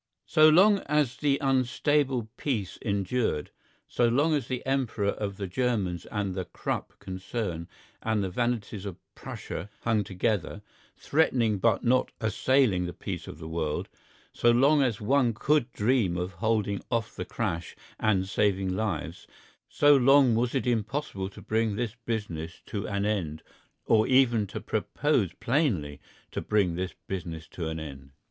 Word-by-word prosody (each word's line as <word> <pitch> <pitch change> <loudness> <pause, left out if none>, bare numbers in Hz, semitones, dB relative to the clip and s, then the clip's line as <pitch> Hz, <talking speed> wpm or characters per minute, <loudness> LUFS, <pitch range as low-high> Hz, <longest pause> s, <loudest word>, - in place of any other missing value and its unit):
So 155 0 +6
long 195 +6 +6
as 150 -4 +1
the 140 -2 +2
unstable 135 -1 +1
peace 110 -10 -3
endured, 100 -5 -1 0.4
so 120 - +2
long 145 +7 +3
as 140 -5 0
the 125 -1 -4
Emperor 125 -6 0
of 100 -2 -4
the 100 - -3
Germans 95 -4 -1
and 100 -3 -2
the 95 -1 -3
Krupp 85 - -4
concern 95 -2 -4 0.3
and 110 -2 0
the 95 - -2
vanities 110 -2 -2
of 95 - -6 0.2
Prussia 100 - -7
hung 110 -3 +1
together, 100 -1 -2 0.3
threatening 120 -9 +2
but - - +2
not 130 +1 +2
assailing 110 -3 +2
the 90 - -7
peace - - -5
of - - -8
the 80 0 -8
world, 80 -2 -2 0.4
so 120 - +3
long 140 +5 +5
as 125 -6 +1
one 120 +1 +2
could 135 +1 +1
dream 105 -6 +1
of 90 +2 -2
holding 105 +1 0
off 115 -2 -1
the - - -3
crash 85 +1 -3 0.2
and 95 -3 +2
saving 95 -2 +1
lives, 90 -5 -3 0.4
so 145 0 +5
long 135 -1 +6
was 120 +3 0
it 135 - 0
impossible 115 -3 -1
to 100 - -13
bring 110 -1 0
this 115 -1 -2
business 85 -8 -4
to 100 - -4
an 100 -1 -1
end 85 -8 -2 0.4
or 110 -1 +4
even 120 -5 +4
to - - -5
propose 130 - 0
plainly 115 - 0 0.3
to - - -3
bring 100 -5 +1
this 90 +2 -4
business 85 -4 -5
to 85 -3 -5
an 80 0 -3
end. 70 -3 -9
110 Hz, 155 wpm, -28 LUFS, 95-125 Hz, 0.4 s, So